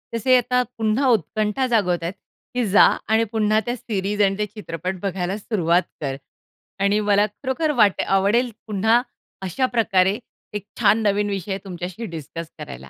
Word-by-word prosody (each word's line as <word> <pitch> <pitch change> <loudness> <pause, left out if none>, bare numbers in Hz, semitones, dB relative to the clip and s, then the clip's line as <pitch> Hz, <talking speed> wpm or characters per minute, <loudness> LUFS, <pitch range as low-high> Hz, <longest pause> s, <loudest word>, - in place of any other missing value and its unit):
तसे 255 +3 +3
आता 250 +1 +2 0.2
पुन्हा 225 +5 +1
उत्कंठा 215 - -1
जागवत 190 -8 +1
आहेत 170 +3 -3 0.4
की 250 -1 +1
जा 210 - +8 0.3
आणि 225 +1 +4
पुन्हा 215 0 +3
त्या 240 - 0
सीरीज 205 -3 -2
आणि 195 0 +3
ते 210 - +1
चित्रपट 185 -3 -6
बघायला 190 +1 -2
सुरुवात 180 -5 +1 0.2
कर. 135 -3 -2 0.7
आणि 200 +1 +3
मला 205 +1 +5
खरोखर 295 +4 -1
वाटे 200 -3 +4
आवडेल 230 +6 +2 0.2
पुन्हा 220 +3 +3 0.5
अशा 260 +9 0
प्रकारे 195 -1 +3 0.4
एक 200 - -10
छान 220 0 +4
नवीन 205 +1 0
विषय 195 -1 -3
तुमच्याशी 180 +3 -6
डिस्कस 160 +1 -7
करायला. 65 +2 -9
205 Hz, 155 wpm, -22 LUFS, 185-225 Hz, 0.7 s, जा